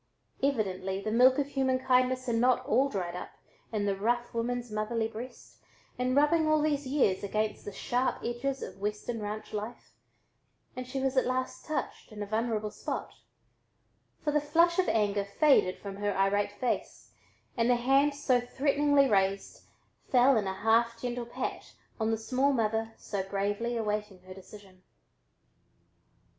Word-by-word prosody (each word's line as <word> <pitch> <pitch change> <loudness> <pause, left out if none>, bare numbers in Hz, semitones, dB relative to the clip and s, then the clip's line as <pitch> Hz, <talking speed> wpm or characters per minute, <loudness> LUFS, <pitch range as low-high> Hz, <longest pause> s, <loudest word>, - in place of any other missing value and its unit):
Evidently 195 -8 -1
the 215 +2 -3
milk 255 +4 +5
of 285 - +1
human 265 -2 +1
kindness 255 0 +2
had 240 - -1
not 250 +1 +3
all 265 +5 +3
dried 180 -6 -3
up 180 - -7 0.4
in 210 -2 -1
the 200 -1 +1
rough 240 +4 -1
woman's 240 0 -2
motherly 220 +1 -1
breast 230 +3 -10 0.4
in 255 +1 +1
rubbing 310 +3 +4
all 310 0 +4
these 290 -2 0
years 255 -10 +1
against 215 +2 -2
the 205 - -5
sharp 245 +6 -1
edges 265 +3 -2
of - - -8
Western 210 +2 -3
ranch 215 +1 -5
life 215 +3 -6 0.8
and 255 0 -6
she 270 +1 -3
was 265 0 0
at 260 - +3
last 255 0 -3
touched 310 -5 -4
in 210 -1 -5
a - - -4
vulnerable 215 0 -1
spot, - - -5 1.1
for 295 - +1
the 300 0 +2
flush 335 +4 +3
of 370 - +2
anger 205 -2 +1
faded 200 -2 +3
from 200 -1 -8
her 205 -1 -1
irate 205 +1 +1
face, 245 +4 -3 0.4
and 235 0 +1
the 245 - +5
hand 270 +4 +3
so 255 -3 +2
threateningly 280 +2 +2
raised 195 -3 0 0.4
fell 255 +1 +5
in 210 -3 +1
a 190 - -2
half 230 +1 +3
gentle 245 0 -4
pat - - -5 0.2
on 220 0 +1
the 225 - +1
small 260 +5 +1
mother 225 -1 0
so 200 -2 -4
bravely 205 +5 -2
awaiting 210 -3 -2
her 185 0 -10
decision. 190 0 -14
235 Hz, 160 wpm, -30 LUFS, 210-260 Hz, 1.1 s, milk